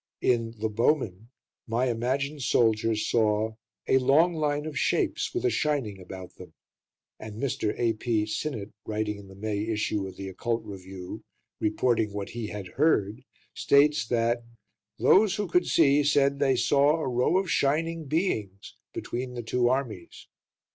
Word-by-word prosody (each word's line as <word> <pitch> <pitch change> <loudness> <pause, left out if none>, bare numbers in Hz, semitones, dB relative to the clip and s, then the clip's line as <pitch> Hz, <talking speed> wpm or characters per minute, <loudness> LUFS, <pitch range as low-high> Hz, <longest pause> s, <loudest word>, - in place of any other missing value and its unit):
In 115 -2 +1
"The 110 +1 -1
Bowmen" 115 - 0 0.4
my 120 +3 +1
imagined 130 +5 -1
soldier 115 -2 +2
saw 110 0 +1 0.3
"a 130 - +4
long 155 +7 +4
line 150 -2 -1
of 155 -2 -6
shapes, - - 0
with 365 +1 -2
a 380 - +3
shining 130 -11 -1
about 90 0 -10
them." - - -13 0.6
And 110 -1 -8
Mr. 120 -5 -1
A.P. 115 -1 0
Sinnett, 110 -2 -4
writing 105 -1 -3
in 100 - -12
the 95 - -13
May 105 +1 -3
issue 105 -2 -1
of 95 - -10
The 95 - -7
Occult 115 +4 -2
Review, 95 -2 -8 0.4
reporting 110 -1 +1
what 100 -1 -4
he 115 -2 -5
had 105 -3 -6
heard, 120 - +1 0.3
states 140 -5 +3
that 120 0 +1 0.5
"those 200 0 +4
who 205 -2 -2
could 180 +1 +2
see 145 -2 +4
said 140 -1 +2
they 135 -2 +3
saw 140 +4 +3
'a 155 - -2
row 125 +8 +2
of 190 -3 -1
shining 160 +3 0
beings' 115 - -2 0.2
between 125 +1 -5
the 120 - -5
two 120 +2 +1
armies." 125 -9 -3
120 Hz, 155 wpm, -27 LUFS, 105-145 Hz, 0.6 s, a